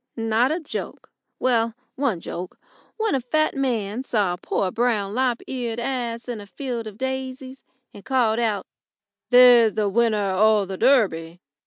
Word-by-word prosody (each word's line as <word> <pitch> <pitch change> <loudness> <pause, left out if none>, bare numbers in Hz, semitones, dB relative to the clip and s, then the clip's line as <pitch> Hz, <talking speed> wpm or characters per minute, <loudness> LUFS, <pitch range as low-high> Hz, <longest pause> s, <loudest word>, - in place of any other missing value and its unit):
Not 225 +3 +1
a 325 - -1
joke 315 - -7 0.3
well, 230 -3 +1 0.2
one 245 -11 -1
joke, 180 +2 -7 0.4
when 440 -1 0
a 270 - +1
fat 310 +6 0
man 235 -5 -1
saw 210 -8 0
a - - -5
poor 185 - -1
brown 220 -4 0
lop 250 -1 0
eared 240 -3 -4
ass 235 -2 -3
in 235 -4 -5
a 205 - -12
field 235 +1 -5
of 210 -1 -9
daisies, 265 0 -5 0.3
and 200 - -12
called 240 -3 +1
out: 220 -4 -1 0.6
"There's 245 -3 +7
the 210 -2 +1
winner 215 -2 +1
o' 215 0 +4
the 190 0 -6
Durby!" 180 -10 +2
235 Hz, 160 wpm, -23 LUFS, 210-260 Hz, 0.6 s, There's